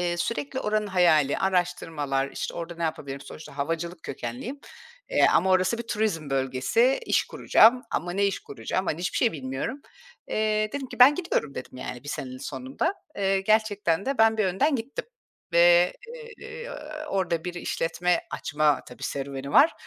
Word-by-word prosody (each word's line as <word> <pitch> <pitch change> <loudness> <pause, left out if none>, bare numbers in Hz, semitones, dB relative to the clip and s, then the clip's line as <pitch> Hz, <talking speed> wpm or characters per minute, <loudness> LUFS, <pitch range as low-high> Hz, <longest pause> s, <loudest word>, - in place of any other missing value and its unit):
eee, 175 -1 0
sürekli 260 +9 -2
oranın 210 0 0
hayali, 170 -7 +3
araştırmalar, 165 -7 0
işte, - - -5
orada 170 0 -5
ne 170 - -5
yapabilirim, 140 -4 -3
sonuçta 145 0 -11
havacılık 165 +3 -3
kökenliyim. 130 - -6 0.5
Eee, - - +5
ama 190 - +3
orası 185 +5 +3
bir - - -3
turizm 210 -10 -2
bölgesi, 135 - +2
iş - - +2
kuracağım 245 +3 +4
ama 175 +2 -2
ne 200 +2 +2
iş 195 - -1
kuracağım, 140 - -4
hani, 155 - -1
hiçbir 180 - -2
şey 235 - +3
bilmiyorum. 135 - -4 0.5
Eee, 215 0 +1
dedim 280 -2 -4
ki, - - -10
“Ben 260 +4 +9
gidiyorum,” 290 - -2
dedim, 130 - -8
yani, 125 0 -7
1 145 - -8
senenin 130 -2 -5
sonunda. 265 - -3 0.2
Eee, 195 -1 +1
gerçekten 205 -3 +1
de 275 -2 -1
ben 220 0 +5
bir 215 - +2
önden 265 - +2
gittim 265 - -5 0.5
ve, 175 +1 +6 0.5
eee, 475 +1 -8 0.4
orada 175 - -1
bir 180 -1 -4
işletme 175 0 0
açma, 150 -2 +1
tabii - - -13
serüveni 140 0 -4
var 310 +4 +7
180 Hz, 165 wpm, -26 LUFS, 150-220 Hz, 0.5 s, Ben